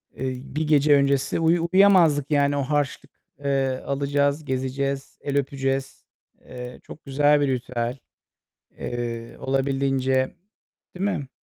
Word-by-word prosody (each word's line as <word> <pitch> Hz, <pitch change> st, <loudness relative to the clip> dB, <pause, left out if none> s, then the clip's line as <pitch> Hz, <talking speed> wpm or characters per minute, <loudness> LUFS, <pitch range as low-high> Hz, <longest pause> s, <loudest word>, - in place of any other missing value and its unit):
eee, 130 Hz, -1 st, -3 dB, 0.2 s
bir 155 Hz, 0 st, -1 dB
gece 145 Hz, -1 st, +5 dB
öncesi 140 Hz, +2 st, +1 dB
uyu 165 Hz, +1 st, +2 dB
uyuyamazdık. 175 Hz, -7 st, +5 dB
Yani 145 Hz, 0 st, +2 dB
o -, -, +1 dB
harçlık, 140 Hz, 0 st, -2 dB, 0.3 s
ııı, 135 Hz, -2 st, 0 dB
alacağız, 140 Hz, +2 st, 0 dB
gezeceğiz, 135 Hz, +1 st, -3 dB
el 140 Hz, 0 st, -2 dB
öpeceğiz. 135 Hz, -1 st, -2 dB, 0.4 s
Eee, 125 Hz, 0 st, -9 dB
çok 150 Hz, -, -12 dB
güzel 145 Hz, +2 st, +3 dB
bir 145 Hz, -, +2 dB
ritüel, 125 Hz, -1 st, -2 dB, 0.8 s
eee, 115 Hz, -1 st, -5 dB
olabildiğince, 135 Hz, -1 st, 0 dB, 0.6 s
değil 185 Hz, +2 st, -3 dB
mi? 135 Hz, -2 st, -7 dB
140 Hz, 120 wpm, -24 LUFS, 130-145 Hz, 0.8 s, gece